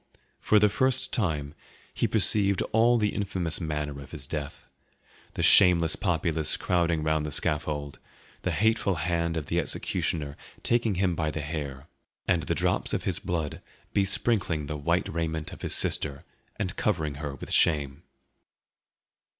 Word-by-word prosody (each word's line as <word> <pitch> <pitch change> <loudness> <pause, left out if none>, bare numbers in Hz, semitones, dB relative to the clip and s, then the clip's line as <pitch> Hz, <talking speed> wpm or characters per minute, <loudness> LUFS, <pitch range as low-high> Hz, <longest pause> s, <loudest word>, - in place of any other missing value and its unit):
For 110 - +3
the 105 0 +6
first 130 +5 +1
time 75 -9 -1 0.4
he - - 0
perceived 100 -3 +3
all 115 +2 +4
the 105 -2 0
infamous 95 -4 -2
manner 75 -3 -3
of 70 - -11
his 65 - -5
death: 75 -1 -6 0.7
the - - -1
shameless 85 -4 +6
populace 80 -4 0
crowding 85 -3 +1
round 80 0 +1
the 75 - -4
scaffold, 75 -1 -1 0.4
the - - -2
hateful 110 -2 +1
hand 85 0 -1
of 75 - -3
the - - 0
executioner 75 -3 -2 0.3
taking 115 -4 +1
him 95 -1 +1
by 80 -2 -1
the 75 0 -4
Hair, 75 -3 -5 0.4
and 85 -2 +2
the 75 - -2
drops - - 0
of - - -3
his - - -1
blood 80 -4 -3 0.3
besprinkling 100 -5 +1
the 75 +1 -4
white 70 -1 0
raiment 80 -2 -3
of - - -11
his - - 0
sister 70 -2 0 0.3
and 95 -4 -3
covering 80 -9 -1
her 70 -2 -4
with - - -9
shame. 70 -2 +2
80 Hz, 150 wpm, -27 LUFS, 75-95 Hz, 0.7 s, the